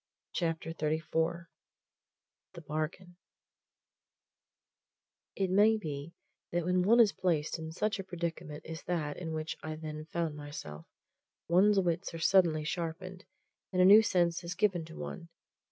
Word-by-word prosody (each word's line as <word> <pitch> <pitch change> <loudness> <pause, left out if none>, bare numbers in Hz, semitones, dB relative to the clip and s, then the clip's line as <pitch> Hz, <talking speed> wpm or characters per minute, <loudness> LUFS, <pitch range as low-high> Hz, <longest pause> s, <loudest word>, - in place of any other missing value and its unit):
CHAPTER 165 -2 -2
XXXIV 160 +2 -1 1.1
THE 170 - -9
BARGAIN 155 +4 -4 2.2
It 190 -2 0
may 210 +3 +5
be 150 -4 -6 0.4
that 175 -1 0
when 180 0 +2
one 225 +6 +5
is 220 -4 +7
placed 165 -5 -1
in 160 0 -6
such 210 +5 -1
a - - -3
predicament 170 -4 -5
as 160 -2 -6
that 155 -5 -1
in 165 -2 -5
which 155 0 -3
I 155 0 -5
then 155 -1 -6
found 165 -2 -2
myself, 145 - -8 0.6
one's 195 +4 +5
wits 175 -1 -1
are - - -5
suddenly 165 -3 +4
sharpened, 175 +3 -4 0.5
and 185 - -1
a 180 - +7
new 205 +3 +9
sense 175 -4 +1
is 170 +1 -5
given 185 -6 +1
to 165 +1 -11
one. 170 -3 -7
170 Hz, 140 wpm, -31 LUFS, 155-185 Hz, 2.2 s, new